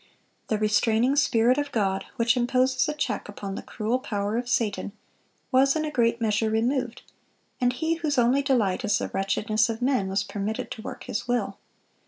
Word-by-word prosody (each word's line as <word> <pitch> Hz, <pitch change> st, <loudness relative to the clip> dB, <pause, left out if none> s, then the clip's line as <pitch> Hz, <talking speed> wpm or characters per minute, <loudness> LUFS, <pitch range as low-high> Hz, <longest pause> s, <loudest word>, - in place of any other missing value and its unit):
The 215 Hz, -, 0 dB
restraining 220 Hz, +4 st, +2 dB
Spirit 250 Hz, -2 st, +3 dB
of 290 Hz, 0 st, -3 dB
God, 195 Hz, -3 st, 0 dB
which 235 Hz, -1 st, +2 dB
imposes 255 Hz, +3 st, +2 dB
a 300 Hz, -, -2 dB
check 295 Hz, -, -3 dB
upon 200 Hz, -1 st, -6 dB
the -, -, -5 dB
cruel 225 Hz, +4 st, -2 dB
power 205 Hz, -4 st, -2 dB
of 240 Hz, +1 st, -2 dB
Satan, 210 Hz, -4 st, -1 dB, 0.6 s
was 275 Hz, +2 st, +4 dB
in 310 Hz, 0 st, 0 dB
a 305 Hz, -, -3 dB
great 235 Hz, -3 st, +1 dB
measure 220 Hz, -1 st, +1 dB
removed, 240 Hz, +2 st, -1 dB, 0.6 s
and 245 Hz, 0 st, +3 dB
he 320 Hz, +6 st, -1 dB
whose 305 Hz, -4 st, -1 dB
only 245 Hz, +3 st, +4 dB
delight 245 Hz, -6 st, +1 dB
is 210 Hz, -, +2 dB
the -, -, -3 dB
wretchedness 215 Hz, +3 st, 0 dB
of 225 Hz, 0 st, -3 dB
men, 250 Hz, -6 st, +1 dB
was 195 Hz, +1 st, 0 dB
permitted 210 Hz, +2 st, -4 dB
to 220 Hz, -, -6 dB
work -, -, -7 dB
his 210 Hz, -, -4 dB
will. 245 Hz, 0 st, -1 dB
235 Hz, 185 wpm, -26 LUFS, 215-260 Hz, 0.6 s, was